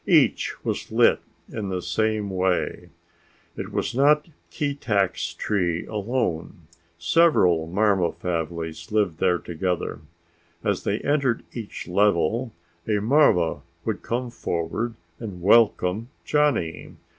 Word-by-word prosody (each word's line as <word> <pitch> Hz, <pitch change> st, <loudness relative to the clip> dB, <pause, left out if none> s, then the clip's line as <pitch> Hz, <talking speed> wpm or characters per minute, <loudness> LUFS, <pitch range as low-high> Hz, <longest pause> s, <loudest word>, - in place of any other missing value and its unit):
Each -, -, +3 dB
was -, -, -3 dB
lit -, -, +4 dB, 0.3 s
in 100 Hz, -3 st, -5 dB
the 95 Hz, -1 st, -2 dB
same 105 Hz, +4 st, -1 dB
way. 95 Hz, -1 st, -1 dB, 0.7 s
It -, -, -6 dB
was -, -, -2 dB
not 150 Hz, +4 st, +4 dB, 0.2 s
Keetack's 105 Hz, -, -1 dB
tree 90 Hz, -4 st, -1 dB
alone; 105 Hz, -7 st, -2 dB, 0.4 s
several 85 Hz, -, +3 dB
marva 95 Hz, -1 st, +2 dB
families 85 Hz, -1 st, -4 dB
lived 105 Hz, -7 st, +1 dB
there 90 Hz, -, +3 dB
together. 85 Hz, -3 st, -3 dB, 0.6 s
As 100 Hz, -3 st, -1 dB
they 105 Hz, +2 st, 0 dB
entered 140 Hz, -5 st, +1 dB
each 115 Hz, -4 st, -7 dB
level 105 Hz, +5 st, +2 dB, 0.4 s
a 105 Hz, -2 st, +2 dB
marva 110 Hz, -, +3 dB, 0.2 s
would 110 Hz, -3 st, -2 dB
come 120 Hz, +1 st, -3 dB
forward 110 Hz, +4 st, -3 dB, 0.2 s
and 95 Hz, -6 st, -7 dB
welcome 105 Hz, 0 st, +3 dB, 0.2 s
Johnny. 145 Hz, -, 0 dB
100 Hz, 110 wpm, -24 LUFS, 85-115 Hz, 0.7 s, lit